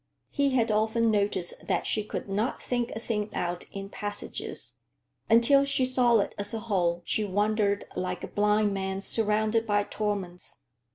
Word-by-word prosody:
He 280 -2 +1
had 230 -3 +2
often 220 +2 +2
noticed 200 -4 0
that - - 0
she 215 - +1
could 210 - -5
not 210 +5 -1
think 245 -1 -1
a - - -5
thing 215 -2 -2
out 175 0 -2
in 195 0 -6
passages. 205 0 -5 0.5
Until 235 +5 +6
she 275 -2 +2
saw 250 -2 +4
it - - -3
as 205 +3 -2
a - - -2
whole, 175 -6 0
she 215 - 0
wandered 205 +1 +1
like 180 -1 -3
a - - -3
blind 210 0 +2
man 190 0 -2
surrounded 220 +2 +2
by 205 -1 +2
torments. 195 -9 -4
210 Hz, 165 wpm, -28 LUFS, 200-230 Hz, 0.5 s, Until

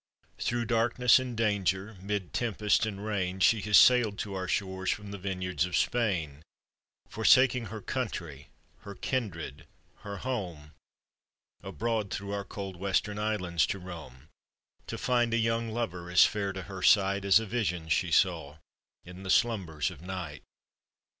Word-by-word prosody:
"Through 120 0 -1
darkness 120 +1 +4
and 125 -3 -5
danger, 100 -1 0
'mid 100 -2 -3
tempest 110 -2 +1
and 100 -1 -6
rain, 95 -3 -2
She 110 +3 +4
has 105 0 +4
sail'd 120 -5 +5
to 100 - -4
our 95 -1 -3
shores 95 -1 -2
from 105 -1 -3
the 100 - -7
vineyards 90 -2 -2
of 90 0 -1
Spain, 85 -12 0 0.7
Forsaking 120 +3 +4
her 110 +1 -7
country, 85 - -4 0.3
her 100 0 -10
kindred, 85 - -4 0.3
her 100 0 -7
home, 90 - -5 0.9
Abroad 110 -2 -2
through 100 +1 -5
our 100 0 -2
cold 95 -2 -7
Western 100 +2 -1
Islands 90 -6 0
to - - -2
roam, 80 -7 -10 0.6
To - - -5
find 120 -2 +1
a - - +3
young 115 0 0
lover 110 -7 -4
as 90 - +7
fair 100 -2 -1
to 95 -1 -6
her 95 +1 -8
sight 100 0 +4
As 100 +2 +6
a 110 - -5
vision 95 -7 -2
she 85 +2 +1
saw 80 -4 +1 0.5
in 90 +1 -11
the 95 - -7
slumbers 95 -8 +1
of 80 -4 -12
night. 90 -5 -6
100 Hz, 155 wpm, -29 LUFS, 90-110 Hz, 0.9 s, as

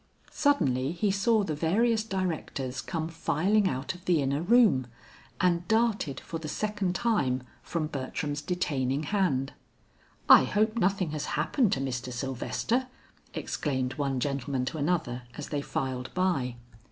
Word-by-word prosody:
Suddenly 140 - +2
he 200 +3 +1
saw 210 +2 +3
the 160 - -2
various 215 +9 +2
directors 165 - -3
come 160 -3 -3
filing 185 +5 +1
out 130 +4 -3
of 180 -1 -14
the 175 -3 +3
inner 140 +1 0
room, 190 - +4 0.5
and 175 -1 +2
darted 220 - +1
for 165 - -6
the 155 - -6
second 205 +1 -1
time 135 - +1 0.2
from 165 -2 -2
Bertram's 145 0 -3
detaining 145 -4 -1
hand. 145 -7 0 0.7
"I - - +9
hope 215 +2 +1
nothing 190 -6 +1
has 150 -1 -3
happened 245 -8 +2
to - - -1
Mr. 130 -1 -3
Sylvester," 135 - -1 0.5
exclaimed 130 -3 -2
one 135 -2 -1
gentleman 135 -1 -1
to 155 +4 -4
another 145 -6 0 0.2
as 150 - -6
they 145 -2 -1
filed 130 -2 -3
by. 150 -10 +1
155 Hz, 140 wpm, -28 LUFS, 135-195 Hz, 0.7 s, I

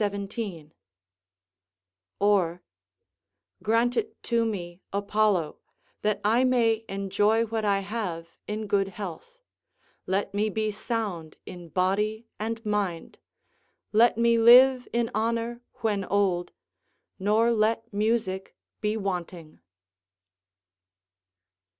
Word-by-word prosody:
] - - +3 2.2
Or: 185 -4 +2 1.0
["Grant 230 +3 +2
it 435 -1 -3
to 235 -1 +1
me, 180 -5 -4
Apollo, 200 -4 +1 0.4
that 210 0 0
I 230 +4 +4
may 230 -3 +2
enjoy 205 +3 +1
what 225 0 -3
I 200 -1 +2
have 190 -5 -4 0.2
in 215 +1 -3
good 200 -1 +1
health; 195 - -8 0.7
let 195 +2 -1
me 210 +2 +1
be 215 +1 -1
sound 205 -7 -4
in 175 -2 -10
body 205 +6 0
and 225 +1 -4
mind; 200 -6 -2 0.7
let 225 +2 +4
me 235 0 +3
live 250 +2 +7
in 235 -1 0
honour 230 +1 -1 0.2
when 210 -3 0
old, 185 -3 0 0.7
nor 215 +4 +3
let 225 0 0
music 205 -3 -1 0.3
be 210 +1 0
wanting." 180 -5 -5
210 Hz, 100 wpm, -27 LUFS, 195-230 Hz, 2.2 s, live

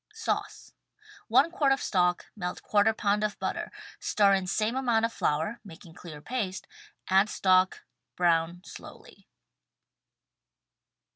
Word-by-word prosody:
Sauce: 450 - -4 0.3
— 420 - -22
i 280 +5 +6
quart 300 -5 +1
of 270 - +2
stock 180 -6 0
— - - -51
melt 180 -3 -4 0.2
% 220 +1 +1
pound 205 +1 +1
of 210 -1 -2
butter - - -4 0.2
— - - -20
stir 200 -2 +3
in 190 -1 0
same 215 +5 0
amount 240 -4 +1
of 230 - -4
flour 160 +10 -1
— - - -51
making 170 -3 -13
clear 165 -3 -10
paste 200 -3 -4 0.3
— - - -44
add 195 +3 +3
stock 185 -2 +2 0.2
— 120 - -58
brown 170 0 +1
slowly. - - -13
200 Hz, 155 wpm, -28 LUFS, 180-230 Hz, 0.3 s, i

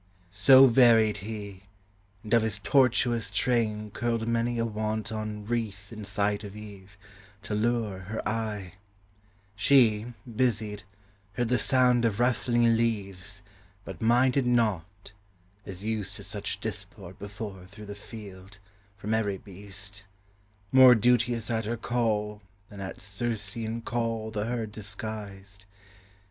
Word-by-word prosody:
So 130 +7 +8
varied 115 -4 +5
he, 100 -2 -7 0.6
and 110 - -4
of 115 - +6
his 110 -2 -1
tortuous 120 0 +2
train 110 -4 0
Curled 115 0 -1
many 115 +1 0
a 115 - +1
wanton 110 -1 -3
wreath 105 -3 -3
in 110 -2 -7
sight 100 +1 -1
of 100 0 -8
Eve, 100 -2 -11 0.5
To - - -5
lure 110 -2 0
her 100 +4 -5
eye; 105 -4 -3 0.8
she, 110 -2 +4 0.2
busied, 110 -3 -1 0.5
heard 120 +1 -1
the 125 - +2
sound 125 -2 +3
Of 110 -2 0
rustling 120 -1 +3
leaves, 100 -4 -2 0.4
but - - -8
minded 125 +3 +3
not, 100 -5 0 0.6
as 95 +1 -7
used 105 -3 -2
To 100 - -5
such 100 +1 -4
disport 100 -3 -7
before 100 +1 -6
her 90 - -13
through 105 +2 -12
the 100 - -7
field, 100 -2 -11 0.4
From 105 +2 -3
every 105 -3 0
beast; 100 +1 -8 0.7
more 130 -1 +9
duteous 120 0 +2
at 110 -1 -1
her 115 +2 -2
call, 105 -3 -1 0.3
Than 100 -2 -9
at 95 - -6
Circean 110 +2 -3
call 115 -2 -2
the 105 -1 -2
herd 115 -2 -3
disguised. 100 -2 -6
110 Hz, 130 wpm, -28 LUFS, 100-115 Hz, 0.8 s, more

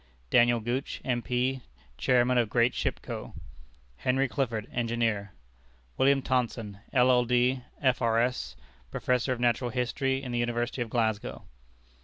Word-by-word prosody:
Daniel 120 -1 +5
Gooch, 120 +5 -3
M.P., 125 +1 0 0.3
Chairman 125 - +3
of 115 -3 +1
"Great 120 +2 +3
Ship - - -2
Co." - - -7 0.6
Henry 130 - +1
Clifford, 115 -5 -2
Engineer. 115 -4 -1 0.6
William 135 0 +3
Thomson, 115 -5 -1
LL.D., 125 0 +3 0.2
F.R.S., 125 -1 +1 0.3
Prof. 125 - 0
of 130 -2 -1
Natural 120 0 +1
Philosophy 130 +2 -1
in 125 - -5
the 120 - -1
University 120 +1 -1
of 120 - -2
Glasgow. 110 -3 -1
120 Hz, 120 wpm, -28 LUFS, 115-130 Hz, 0.6 s, Daniel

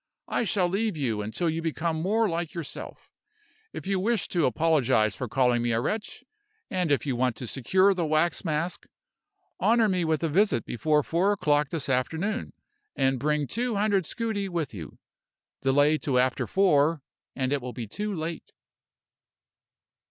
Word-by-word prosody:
I 235 - 0
shall 195 -4 +1
leave 200 0 -1
you 115 -7 -1
until 110 +11 -2
you 165 0 -1
become 165 0 -2
more 215 +5 +2
like 170 -1 -3
yourself. 165 -4 -7 0.6
If - - -8
you 195 -1 0
wish 225 +2 0
to 170 -5 +2
apologize 125 - +2
for 125 - -4
calling 125 -1 +2
me 120 -1 0
a 115 - +1
wretch, 210 - -3 0.5
and 180 -4 0
if 145 - +2
you 135 -3 -1
want 125 -1 +1
to 125 - -6
secure 185 - +2
the 175 -4 -1
wax 155 +3 +1
mask, 165 +1 -2 0.7
honor 230 -1 +4
me 185 -3 +1
with 160 0 0
a - - +2
visit 185 - +2
before 150 +4 +1
four 180 +7 +1
o'clock 150 -6 +1
this 160 -3 -3
afternoon, 160 - -1 0.4
and 135 -1 +1
bring 150 +1 0
two 235 - -2
hundred 200 -4 +1
scudi 215 -4 -2
with 170 -7 -3
you. 85 -7 -9 0.6
Delay 145 +3 +3
till 135 -3 0
after 130 +1 +1
four, 165 -5 +3 0.3
and 130 0 0
it 145 - 0
will 125 0 -5
be 120 - -5
too 210 - -4
late." 165 -2 -5
160 Hz, 165 wpm, -27 LUFS, 135-190 Hz, 0.7 s, honor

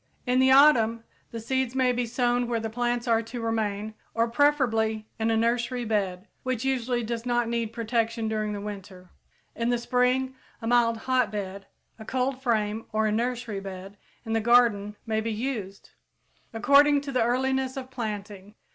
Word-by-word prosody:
In 250 0 +2
the 260 0 +5
autumn, 235 -5 +5 0.3
the 230 - -6
seeds 260 +2 -1
may 260 -1 +3
be 245 -1 -1
sown 245 0 +1
where 235 -1 -1
the 225 0 -4
plants 240 +1 -1
are 230 -1 +3
to 230 +2 -7
remain 220 -2 -2 0.2
or 230 +1 +2
preferably 230 -5 +1
in 220 0 +1
a 225 - +2
nursery 240 +2 0
bed, 200 -3 -1
which 255 -1 -2
usually 250 -2 0
does 230 0 -3
not 240 -1 0
need 230 -1 -2
protection 230 0 -1
during 215 -1 -1
the 205 - -5
winter. 195 -3 -9 0.4
In 235 0 -1
the 245 - +2
spring 250 +2 +1 0.3
a 225 - -8
mild 230 -1 +3
hotbed, 205 -6 -1 0.3
a 220 - -9
cold 260 +2 -1
frame 220 -3 -1
or 215 0 +1
a 215 - +1
nursery 235 -1 -2
bed 195 0 -8 0.3
in 225 - -3
the 225 - +1
garden 220 -3 +3
may 220 -1 0
be 225 +1 -2
used, 215 -4 -5 0.6
according 280 +5 +5
to 280 -1 -6
the 255 -2 +1
earliness 260 +2 0
of 260 -1 -7
planting. 210 -4 -6
230 Hz, 175 wpm, -26 LUFS, 215-250 Hz, 0.6 s, the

